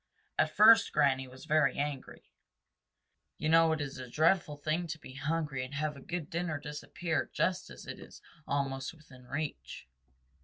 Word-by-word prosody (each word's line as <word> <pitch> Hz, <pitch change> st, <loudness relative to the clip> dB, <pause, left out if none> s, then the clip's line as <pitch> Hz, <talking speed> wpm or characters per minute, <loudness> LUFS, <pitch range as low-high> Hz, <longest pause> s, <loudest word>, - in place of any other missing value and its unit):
At -, -, +4 dB
first 225 Hz, +2 st, +7 dB
Granny 135 Hz, -3 st, +3 dB
was 130 Hz, +3 st, -12 dB
very 155 Hz, -1 st, +3 dB
angry. 145 Hz, -2 st, -4 dB, 1.1 s
You 155 Hz, -, -1 dB
know 165 Hz, 0 st, +6 dB
it 160 Hz, -, 0 dB
is 140 Hz, -2 st, -5 dB
a 125 Hz, -1 st, -7 dB
dreadful 155 Hz, +1 st, +2 dB
thing 155 Hz, +4 st, -1 dB
to 160 Hz, 0 st, -4 dB
be 130 Hz, -, -12 dB
hungry 145 Hz, -1 st, -2 dB
and 130 Hz, +3 st, -7 dB
have 150 Hz, +1 st, -1 dB
a 140 Hz, -, -11 dB
good 175 Hz, -1 st, -4 dB
dinner 170 Hz, -3 st, -2 dB
disappear 150 Hz, +2 st, -3 dB
just 185 Hz, 0 st, 0 dB
as -, -, -11 dB
it -, -, -7 dB
is -, -, -12 dB, 0.3 s
almost 135 Hz, +1 st, -2 dB
within 130 Hz, -5 st, -17 dB
reach. 145 Hz, -, -5 dB
150 Hz, 165 wpm, -32 LUFS, 140-165 Hz, 1.1 s, first